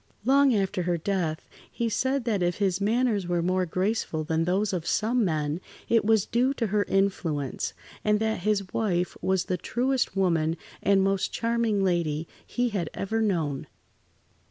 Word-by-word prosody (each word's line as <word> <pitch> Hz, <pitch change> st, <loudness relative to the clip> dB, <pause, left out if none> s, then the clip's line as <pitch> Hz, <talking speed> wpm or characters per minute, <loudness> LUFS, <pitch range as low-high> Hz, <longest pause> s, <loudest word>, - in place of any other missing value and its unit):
Long 275 Hz, -1 st, +5 dB
after 195 Hz, -1 st, 0 dB
her 175 Hz, 0 st, 0 dB
death 165 Hz, -3 st, -2 dB, 0.2 s
he 235 Hz, -, -1 dB
said 260 Hz, +3 st, 0 dB
that 215 Hz, -5 st, 0 dB
if 175 Hz, 0 st, +1 dB
his 195 Hz, -2 st, 0 dB
manners 215 Hz, -2 st, +1 dB
were 175 Hz, -1 st, 0 dB
more 185 Hz, +1 st, +1 dB
graceful 185 Hz, -3 st, -1 dB
than 160 Hz, +1 st, 0 dB
those 195 Hz, +3 st, +1 dB
of 175 Hz, -2 st, -3 dB
some 230 Hz, +3 st, +1 dB
men, 155 Hz, -2 st, -1 dB, 0.3 s
it 230 Hz, -1 st, +4 dB
was 220 Hz, -1 st, +3 dB
due 255 Hz, +4 st, +1 dB
to 235 Hz, -, -1 dB
her 205 Hz, -1 st, +1 dB
influence, 170 Hz, -9 st, -1 dB, 0.3 s
and 210 Hz, 0 st, +3 dB
that 220 Hz, 0 st, 0 dB
his 200 Hz, 0 st, -1 dB
wife 180 Hz, -5 st, 0 dB
was 190 Hz, -1 st, +1 dB
the 180 Hz, -, -1 dB
truest 245 Hz, +4 st, 0 dB
woman, 165 Hz, -3 st, +2 dB, 0.2 s
and 195 Hz, -1 st, +3 dB
most 195 Hz, 0 st, +1 dB
charming 230 Hz, -3 st, 0 dB
lady 165 Hz, -4 st, 0 dB, 0.2 s
he 245 Hz, 0 st, 0 dB
had 190 Hz, -7 st, -2 dB
ever 220 Hz, +3 st, -1 dB
known. 160 Hz, -10 st, -1 dB
195 Hz, 165 wpm, -27 LUFS, 175-220 Hz, 0.3 s, Long